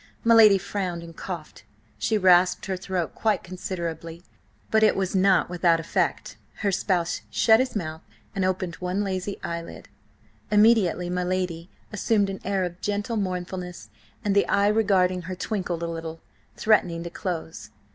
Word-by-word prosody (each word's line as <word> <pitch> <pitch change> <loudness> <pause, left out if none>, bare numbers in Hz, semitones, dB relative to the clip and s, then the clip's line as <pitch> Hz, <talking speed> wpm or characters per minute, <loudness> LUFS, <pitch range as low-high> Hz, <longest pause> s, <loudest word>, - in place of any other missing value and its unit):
My 230 - +5
lady 215 -3 +8
frowned 180 -3 -4
and 165 -1 -11
coughed. 170 -4 -7 0.4
She 220 - +1
rasped 180 -2 +4
her 190 -1 -2
throat 185 -2 -3
quite 220 -1 0
considerably, 170 -2 -6 0.5
but 220 - +4
it 215 - +5
was 190 -1 -1
not 190 -1 +4
without 175 -1 +2
effect; 165 - -2 0.3
her 200 - +3
spouse 180 -2 0
shut 220 0 +4
his 255 -2 -1
mouth 160 -5 -4 0.3
and 195 - 0
opened 185 -2 -1
one 180 +3 -2
lazy 195 0 -3
eyelid. 170 0 -6 0.6
Immediately 210 -5 +3
my 180 0 -1
lady 180 -1 -2 0.2
assumed 205 -1 +1
an 190 - -7
air 195 -1 0
of 175 0 -5
gentle 205 +3 -2
mournfulness, 180 -2 -4 0.3
and 200 -1 +1
the 200 - +3
eye 200 +1 +3
regarding 190 -4 +2
her 185 - -3
twinkled 180 -4 -3
a - - -1
little, 165 -1 -6 0.4
threatening 180 -6 +2
to 170 - -7
close. 160 - -5
185 Hz, 155 wpm, -25 LUFS, 175-200 Hz, 0.6 s, lady